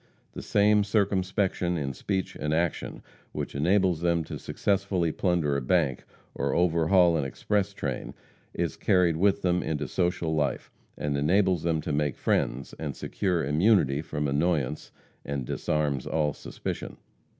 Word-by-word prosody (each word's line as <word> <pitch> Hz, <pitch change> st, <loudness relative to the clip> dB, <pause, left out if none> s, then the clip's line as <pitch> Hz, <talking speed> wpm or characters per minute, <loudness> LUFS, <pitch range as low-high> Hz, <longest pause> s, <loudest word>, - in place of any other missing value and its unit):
The -, -, -6 dB
same 105 Hz, 0 st, +3 dB
circumspection 95 Hz, -3 st, 0 dB
in 70 Hz, -3 st, -2 dB
speech 95 Hz, +6 st, -3 dB
and 75 Hz, +2 st, -1 dB
action 85 Hz, 0 st, -2 dB, 0.3 s
which -, -, -4 dB
enables 90 Hz, +3 st, +2 dB
them 85 Hz, -1 st, +1 dB
to -, -, -7 dB
successfully 95 Hz, -4 st, 0 dB
plunder 85 Hz, -5 st, 0 dB
a 70 Hz, -, 0 dB
bank 70 Hz, -1 st, +1 dB, 0.3 s
or -, -, -1 dB
overhaul 85 Hz, 0 st, +4 dB
an 75 Hz, -, 0 dB
express 100 Hz, -, -1 dB
train 70 Hz, -9 st, -5 dB, 0.4 s
is -, -, -2 dB
carried 90 Hz, -3 st, +3 dB
with 100 Hz, +4 st, +2 dB
them 90 Hz, -1 st, +2 dB
into 75 Hz, -2 st, -2 dB
social 90 Hz, 0 st, 0 dB
life, 75 Hz, -4 st, -1 dB, 0.3 s
and 75 Hz, -1 st, -2 dB
enables 90 Hz, +4 st, +2 dB
them 80 Hz, -1 st, 0 dB
to -, -, -3 dB
make 75 Hz, -1 st, 0 dB
friends 65 Hz, +3 st, -1 dB
and 75 Hz, -4 st, -4 dB
secure 90 Hz, -6 st, -1 dB
immunity 75 Hz, -2 st, +3 dB
from 75 Hz, -2 st, -3 dB
annoyance, 75 Hz, -1 st, 0 dB, 0.3 s
and 70 Hz, -2 st, -3 dB
disarms 75 Hz, 0 st, -1 dB
all 75 Hz, -2 st, 0 dB
suspicion. -, -, -6 dB
85 Hz, 145 wpm, -27 LUFS, 75-95 Hz, 0.4 s, overhaul